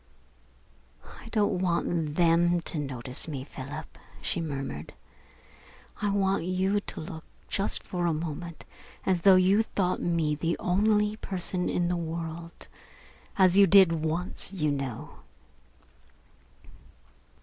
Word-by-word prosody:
"I - - -12
don't 205 -4 +1
want 170 -4 0
them 175 0 +3
to 165 -1 -3
notice 130 -1 -2
me, 140 -5 -4
Philip," 135 0 -8 0.2
she 170 - -2
murmured. 135 - -5 1.1
"I 205 - +1
want 195 -2 +1
you 190 +3 +1
to - - -4
look 160 -1 -7 0.2
just 200 - -1
for 175 -1 -2
a - - +2
moment 165 +1 -5 0.4
as 185 -3 +1
though 195 +1 +7
you 185 +3 +4
thought 190 -4 -1
me 165 -3 +1
the 165 +3 -1
only 210 +3 +2
person 185 -3 -2
in 175 -1 0
the 175 0 0
world 165 0 -6 0.7
as 190 0 +5
you 200 - +8
did 190 -2 +7
once, 165 +3 -1
you 155 -6 0
know." 135 -5 -5
175 Hz, 125 wpm, -28 LUFS, 160-190 Hz, 1.1 s, you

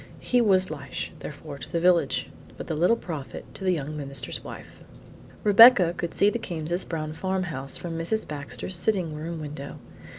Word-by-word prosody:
He 245 -1 +2
was 190 -5 +3
"Lishe," 140 -4 -5
therefore, 145 -1 -8
to - - -9
the 170 - 0
village, 175 0 +2 0.3
but - - -6
the - - -3
Little 175 +8 +3
Prophet 160 -11 -7
to - - -10
the 185 - +2
young 155 -2 -4
minister's 140 -3 -3
wife. - - -10 0.6
Rebecca 205 -4 +8
could 170 -1 -4
see 205 +1 +4
the 235 - -3
Cames' 170 -2 -2
brown 155 -2 -3
farmhouse 170 -7 -2
from 165 -2 -5
Mrs. 220 +7 -1
Baxter's 150 +5 -3
sitting 180 -3 0
room 160 +2 -5
window. 145 -2 -7
165 Hz, 170 wpm, -26 LUFS, 150-185 Hz, 0.6 s, Rebecca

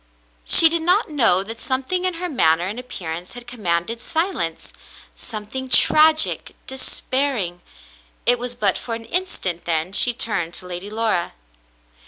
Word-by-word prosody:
She 330 - +10
did 330 0 +1
not 360 +2 +2
know 225 -10 +3
that 225 +3 -6
something 270 +8 -2
in 365 -2 0
her 360 +2 -4
manner 170 - +2
and 205 +6 -5
appearance 175 -8 -7
had 245 0 -10
com 245 -1 -11
manded 175 +4 -1
silence 320 - -3 0.2
— - - -17
something 240 +4 -6
tragic 310 +4 +4
— - - -38
despairing. 260 -8 -2 0.6
It 245 0 +2
was 245 0 -5
but 205 -5 0
for 230 - -5
an 225 0 -9
instant, 225 - -3
then 165 +1 -2
she 245 +3 +1
turned 175 -8 -2
to 185 - -7
Lady 180 +2 -7
Laura. 215 -5 -2
230 Hz, 160 wpm, -21 LUFS, 180-275 Hz, 0.6 s, She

